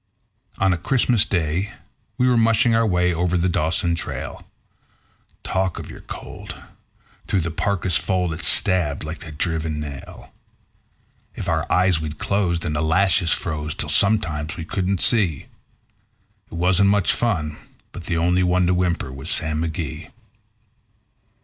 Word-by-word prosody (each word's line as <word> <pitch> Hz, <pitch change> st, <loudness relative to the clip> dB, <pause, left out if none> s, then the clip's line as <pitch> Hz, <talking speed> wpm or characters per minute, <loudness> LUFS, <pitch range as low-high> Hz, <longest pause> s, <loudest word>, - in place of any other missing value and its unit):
On 95 Hz, -1 st, +2 dB
a 85 Hz, -, -3 dB
Christmas 120 Hz, +1 st, +2 dB
Day 90 Hz, +3 st, -1 dB, 0.4 s
we 125 Hz, 0 st, +2 dB
were 125 Hz, -, +3 dB
mushing 115 Hz, 0 st, +3 dB
our 115 Hz, 0 st, +3 dB
way 90 Hz, -2 st, +2 dB
over 90 Hz, +1 st, 0 dB
the 85 Hz, +1 st, +1 dB
Dawson 85 Hz, 0 st, 0 dB
trail. 85 Hz, -, -5 dB, 1.0 s
Talk 95 Hz, -1 st, -1 dB
of -, -, -8 dB
your -, -, -11 dB
cold! -, -, -9 dB, 0.7 s
through 95 Hz, -, +1 dB
the 85 Hz, 0 st, -3 dB
parka's 90 Hz, +1 st, 0 dB
fold 90 Hz, -3 st, -1 dB
it 80 Hz, -, -7 dB
stabbed 80 Hz, -2 st, +4 dB
like 80 Hz, +2 st, -7 dB
a -, -, -8 dB
driven 80 Hz, 0 st, -2 dB
nail. 70 Hz, -2 st, -9 dB, 1.0 s
If -, -, -6 dB
our 80 Hz, -3 st, -1 dB
eyes 90 Hz, -3 st, +3 dB
we'd 75 Hz, -1 st, -5 dB
close, 90 Hz, -3 st, 0 dB
then 80 Hz, -3 st, -3 dB
the 75 Hz, -, -1 dB
lashes 85 Hz, +1 st, +2 dB
froze 75 Hz, -2 st, -2 dB
till 75 Hz, -, -2 dB
sometimes 80 Hz, -3 st, +2 dB
we 80 Hz, -, -5 dB
couldn't 95 Hz, +1 st, -1 dB
see; 95 Hz, -, +3 dB, 1.1 s
It -, -, -8 dB
wasn't 90 Hz, +3 st, +3 dB
much 100 Hz, -2 st, +2 dB
fun, 80 Hz, -11 st, -1 dB, 0.3 s
but 90 Hz, -, -9 dB
the 85 Hz, -, -1 dB
only 90 Hz, +2 st, +2 dB
one 90 Hz, 0 st, +2 dB
to 90 Hz, -, +2 dB
whimper 90 Hz, -6 st, -1 dB
was 65 Hz, +4 st, -7 dB
Sam 75 Hz, 0 st, +1 dB
McGee. 80 Hz, -2 st, -4 dB
85 Hz, 150 wpm, -22 LUFS, 80-95 Hz, 1.1 s, stabbed